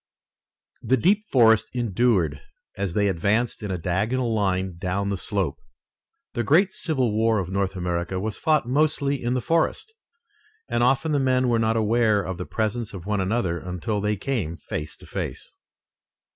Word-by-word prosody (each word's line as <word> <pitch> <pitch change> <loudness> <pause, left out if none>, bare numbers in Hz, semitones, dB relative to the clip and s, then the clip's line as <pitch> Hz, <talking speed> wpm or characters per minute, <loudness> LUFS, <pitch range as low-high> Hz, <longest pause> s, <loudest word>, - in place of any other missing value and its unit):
The 130 - +2
deep 205 - +2
forest 115 -4 +5
endured 105 - +1 0.3
as 100 -3 -3
they 100 -1 +3
advanced 100 +6 0
in 105 - -4
a 95 - -1
diagonal 110 +8 0
line 95 -4 0
down 100 +2 -1
the 100 - 0
slope. - - -2 0.7
The 120 - -1
great 175 - +4
civil 135 - 0
war 110 0 +3
of 95 -3 -2
North 95 0 -1
America 90 0 -2
was 105 +2 -3
fought 155 -6 +2
mostly 140 0 +1
in 120 +1 0
the 125 - 0
forest, 165 - 0 0.7
and - - 0
often 135 +6 +2
the 145 - +2
men 130 -1 +2
were 115 -1 +2
not 110 0 +1
aware 110 -1 +2
of 90 0 -5
the 90 - -5
presence 110 0 -2
of 90 -2 -8
one 105 -1 0
another 95 -3 0
until 90 +3 -3
they 105 0 0
came 100 - -2
face 75 -1 -6
to - - -14
face. - - -6
110 Hz, 170 wpm, -24 LUFS, 95-125 Hz, 0.7 s, forest